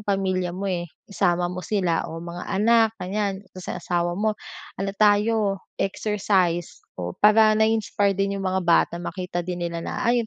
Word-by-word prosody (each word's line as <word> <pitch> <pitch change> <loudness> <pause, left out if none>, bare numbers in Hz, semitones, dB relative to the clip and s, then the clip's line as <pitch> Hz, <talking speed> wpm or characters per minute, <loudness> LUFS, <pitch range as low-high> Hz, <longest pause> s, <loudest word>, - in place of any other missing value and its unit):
pamilya 185 -2 0
mo, 200 - -4
eh. 175 -2 -2 0.2
Isama 180 -3 0
mo 180 - -5
sila 180 -5 0
o 165 - -7
mga 175 +1 -7
anak 225 +3 +4
ganiyan 195 +1 -3
tapos 185 -1 -10
yung - - -3
asawa 175 -1 0
mo, 215 +1 +1 0.5
"Ano 195 0 -1
tayo 210 -1 +3 0.2
exercise" 195 -4 0 0.2
o, 90 -1 -4
para 215 +1 +5
na-iinspire 215 -2 +1
din 195 0 -1
yung 190 - -2
mga 190 0 0
bata 170 0 +3
makita 175 0 -4
din 180 0 -4
nila 170 0 -5
na, - - -4
"ah, 240 -1 +2
yung 230 -2 0
195 Hz, 175 wpm, -24 LUFS, 175-210 Hz, 0.5 s, para